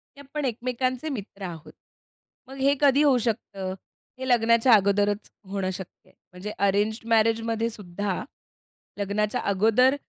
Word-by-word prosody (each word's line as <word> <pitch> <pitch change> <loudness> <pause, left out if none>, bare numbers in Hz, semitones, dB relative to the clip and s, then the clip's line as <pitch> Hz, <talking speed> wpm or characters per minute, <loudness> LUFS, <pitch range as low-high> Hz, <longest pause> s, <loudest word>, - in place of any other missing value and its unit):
की - - -16
आपण 285 +1 -4
एकमेकांचे 255 +4 -2
मित्र 205 -6 -7
आहोत. 165 -3 -8 0.7
मग 265 - -10
हे 275 +1 +3
कधी 285 +1 +5
होऊ 275 -4 +5
शकतं? 205 -5 -2 0.5
हे 260 - -4
लग्नाच्या 230 0 +4
अगोदरचं 205 0 +2 0.2
होणं 195 -1 -2
शक्य 190 -1 -10
आहे. - - -25 0.2
म्हणजे 185 +4 -7
अरेंज्ड 205 +3 +1
मॅरेजमध्ये 225 0 +2
सुद्धा, 200 -2 -4 0.8
लग्नाच्या 205 +1 0
अगोदर 225 +7 +3
220 Hz, 130 wpm, -26 LUFS, 200-255 Hz, 0.8 s, कधी